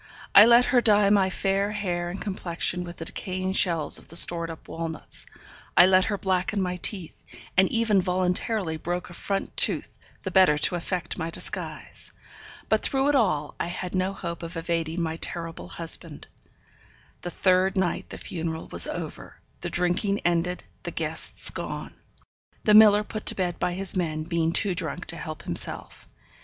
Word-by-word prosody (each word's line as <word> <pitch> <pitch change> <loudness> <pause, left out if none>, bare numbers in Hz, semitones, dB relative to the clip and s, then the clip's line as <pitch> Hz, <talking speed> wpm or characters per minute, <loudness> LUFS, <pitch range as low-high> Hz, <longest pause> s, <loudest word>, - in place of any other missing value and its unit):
I 205 - +10
let 240 +1 +6
her 245 - +5
dye 205 -3 +4
my 195 -2 +3
fair 195 +2 -1
hair 175 -4 -3
and 185 +3 -6
complexion 180 -2 -2
with 175 0 -9
the 165 - -6
decaying 185 +2 -4
shells 165 -6 0
of - - -16
the 165 - -10
stored 170 -1 +5
up 160 - -10
walnuts, 165 -1 -5 0.5
I 175 - +9
let 185 0 +4
her 205 - -2
blacken 190 +1 -1
my 180 -1 -2
teeth, 180 -2 -3 0.3
and 190 +1 +4
even 225 -4 +2
voluntarily 180 0 -1
broke 175 +2 -4
a - - -10
front 195 +3 -4
tooth - - +3 0.2
the - - -4
better 185 -6 +5
to 150 - +2
effect 175 0 -4
my 165 0 -3
disguise. - - -6 0.6
But - - +1
through 270 +1 +1
it 290 - +2
all 155 - +1
I - - -2
had 180 +1 -6
no 185 +1 0
hope 170 -3 -6
of 170 0 -7
evading 165 0 -2
my 160 0 -3
terrible 165 - -5
husband. 90 - +2 1.0
The 175 - -5
third 185 +2 +1
night 185 -2 -1
the - - -8
funeral 165 -2 -5
was 85 0 +5
over, - - -7 0.2
the - - -4
drinking 180 +3 -1
ended, 175 +1 0 0.2
the - - -5
guests - - +1
gone; - - -6 0.7
the 210 - +3
miller 210 -1 +7
put 215 0 -7
to - - +5
bed 180 -2 -2
by 180 - -1
his 190 +1 -1
men, 155 -4 -2
being 165 0 -1
too 195 +2 +2
drunk 175 -1 -4
to 170 - -4
help 155 -2 -7
himself. - - -2
180 Hz, 175 wpm, -25 LUFS, 170-195 Hz, 1.0 s, I